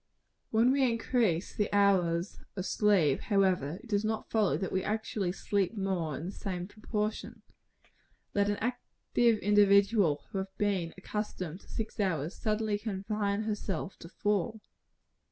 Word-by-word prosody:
When 230 +3 +4
we 275 +1 +2
increase 225 -6 0
the 210 - -1
hours 190 -3 +2 0.2
of 185 -2 -3
sleep, 195 -12 +3
however, 185 -7 +1
it - - -12
does 205 -1 +1
not 220 0 -2
follow 215 -4 +2
that 190 - -3
we 190 - 0
actually 210 -3 -1
sleep 200 +2 -1
more 180 -7 -1
in 160 - -6
the 185 - -4
same 180 -3 -4
proportion. 215 0 -4 0.9
Let 200 0 +2
an 205 - 0
active 240 0 0
individual, 200 -4 +4
who 195 - -2
has 190 - -3
been 195 -5 0
accustomed 185 -4 -4
to - - -20
six 225 -1 -5
hours, 165 -4 0
suddenly 215 -1 -1
confine 205 0 -2
herself 205 -4 -3
to 165 - -10
four. 210 +3 -1
200 Hz, 145 wpm, -31 LUFS, 185-215 Hz, 0.9 s, When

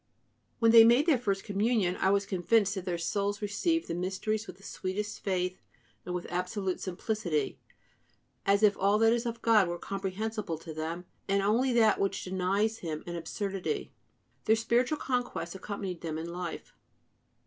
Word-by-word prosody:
When 230 -1 +4
they 230 -1 +10
made 240 +6 +5
their 305 -7 +4
first 200 -4 -1
Communion, 205 -2 +1
I 190 - +2
was 200 0 +2
convinced 195 +2 +2
that 190 -3 -5
their 175 -2 -1
souls 200 +4 -1
received 325 - 0
the - - -3
mysteries 195 +5 -2
with 185 - -9
the 195 - -20
sweetest 205 +3 -4
faith 185 -1 -1 0.5
and 180 - -2
with 180 - -4
absolute 180 +1 -2
simplicity, 180 -5 -2 0.8
as 200 +2 +3
if 205 -1 +6
all 200 +2 +3
that 225 +1 +5
is 240 0 -1
of 230 0 -5
God 215 -5 +5
were 175 0 -3
comprehensible 195 -1 -3
to 160 0 -9
them, 165 +3 -4 0.2
and 195 0 +2
only 235 +6 +2
that 220 -3 +4
which 195 - -1
denies 195 +4 0
Him 155 -3 -5
an 175 - -5
absurdity. 195 - -3 0.5
Their 220 - +5
spiritual 240 +6 +1
conquest 245 -10 -2
accompanied 190 -2 -5
them 160 -2 -3
in 165 +2 -5
life. 175 -1 -6
195 Hz, 170 wpm, -30 LUFS, 180-220 Hz, 0.8 s, they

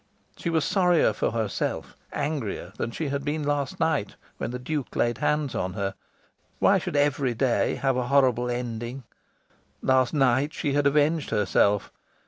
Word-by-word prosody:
She 170 - -3
was 160 -3 +1
sorrier 180 -4 +3
for - - 0
herself, 110 -3 -2 0.2
angrier, 140 - -3
than - - -2
she 145 +5 -3
had 140 0 -2
been 150 +1 -2
last 145 -2 -1
night 160 -10 0 0.2
when - - -2
the 125 - -4
Duke 140 +2 -4
laid 120 -2 +1
hands 150 -3 0
on 95 -5 -2
her. 100 -1 -2 0.6
Why - - +4
should - - -5
every 140 -3 +2
day 125 0 +1
have 135 -2 0
a 125 -1 -1
horrible 125 -3 +3
ending? 120 +1 -4 0.8
Last 130 -2 +3
night 135 +1 +2
she 145 - -1
had 145 0 +3
avenged 150 +2 +2
herself. 105 -1 +2
135 Hz, 160 wpm, -26 LUFS, 120-145 Hz, 0.8 s, Why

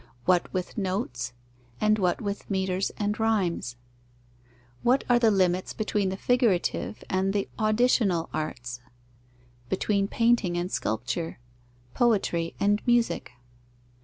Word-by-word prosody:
What 180 -1 +2
with 185 +4 -3
notes, 185 - -2 0.5
and 215 0 +3
what 180 -2 +1
with 200 -1 -4
metres 190 -1 0
and 210 +1 -1
rhymes? 185 - 0 1.1
What 255 +3 +3
are 245 -1 +4
the 230 -2 +5
limits 185 -3 +1
between 210 -2 0
the 190 - -4
figurative 225 -4 +1
and 190 +1 0
the 200 -1 0
auditional 215 -5 +2
arts, 125 -5 -4 0.9
between 200 +1 +1
painting 230 -6 +2
and 175 +2 -2
sculpture, 120 +10 -2 0.6
poetry 195 -8 +1
and 205 +1 +2
music? 240 - +1
195 Hz, 115 wpm, -27 LUFS, 175-215 Hz, 1.1 s, the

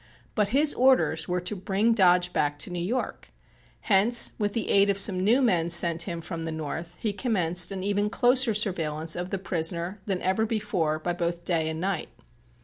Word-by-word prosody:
But 210 -2 +1
his 285 +7 +2
orders 255 -11 +2
were 180 0 -1
to 180 +4 -3
bring 200 +4 0
Dodge 180 -4 +3
back 145 0 0
to 145 - -7
New 175 -1 -3
York. 240 +8 -4 0.5
Hence, 220 +4 +3
with 205 -1 -1
the 230 - -3
aid 200 0 +4
of 200 - +1
some 190 -2 +4
new 240 +7 +3
men 170 -8 +1
sent 170 -1 +4
him 170 -1 -5
from 165 0 -6
the 165 - -4
North, 160 +2 -6
he 215 -3 -2
commenced 185 -6 0
an 190 -1 -5
even 205 +1 0
closer 245 0 +2
surveillance 160 -6 -1
of 180 +1 -4
the 195 - -2
prisoner 175 +1 -4
than 190 -3 -1
ever 190 +4 0
before 175 -8 -1
by 175 +3 -3
both 170 0 -3
day 160 -3 0
and 160 0 -5
night. 185 -2 -3
185 Hz, 195 wpm, -26 LUFS, 170-210 Hz, 0.5 s, aid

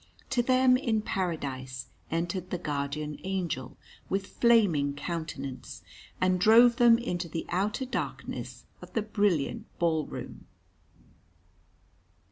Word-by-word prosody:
To 255 -2 +3
them 255 +1 +4
in 225 -5 0
Paradise 135 - -3 0.2
entered 175 +2 -2
the 180 - -2
Guardian 150 -1 -3
Angel 175 -9 -3 0.3
with 195 0 0 0.2
flaming 185 -13 +4
countenance, 145 -5 -5 0.4
and 185 0 +2
drove 230 +4 +7
them 235 -1 +7
into 180 -7 -3
the 165 +1 -4
outer 205 +8 0
darkness 255 - -5 0.2
of - - -12
the 225 - 0
brilliant 205 -8 0
ball 160 -3 +1
room. - - -8
180 Hz, 110 wpm, -29 LUFS, 150-220 Hz, 0.4 s, drove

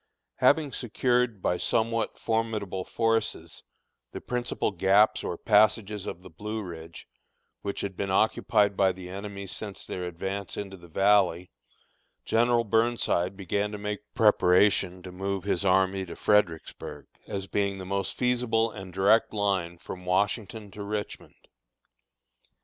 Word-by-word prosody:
Having 150 -4 +3
secured, 120 -3 0
by 90 - +1
somewhat 115 +4 0
formidable 110 -5 -1
forces, 115 -8 -1 0.5
the - - -5
principal 125 -3 -2
gaps 100 +3 +3
or 85 - -3
passages 105 -1 +2
of 90 - -6
the 95 - -11
Blue 105 +6 -5
Ridge, 80 -2 -9 0.5
which 100 -1 -3
had 95 -1 -4
been 100 +1 -3
occupied 105 0 +2
by 95 -1 +3
the 90 0 -9
enemy 100 0 -6
since 100 +1 -6
their 90 - -4
advance 95 +3 -4
into 95 -1 -5
the 85 -2 -14
Valley, 95 0 +2 0.7
General 120 +1 +3
Burnside 110 -4 +1
began 100 +2 -1
to - - -4
make 105 0 -6
preparations 95 -3 +4
to 90 - -8
move 95 +1 -3
his 100 -2 0
army 95 0 +2
to 85 - -7
Fredericksburg, 95 -6 0 0.2
as 95 -1 -4
being 100 0 -1
the 95 - -7
most 100 +1 -2
feasible 120 -2 +1
and 95 -3 -9
direct 100 +5 +3
line 95 -5 -1
from 90 +1 -9
Washington 105 +2 -1
to 105 - -9
Richmond. 105 +1 -6
100 Hz, 140 wpm, -27 LUFS, 95-110 Hz, 0.7 s, preparations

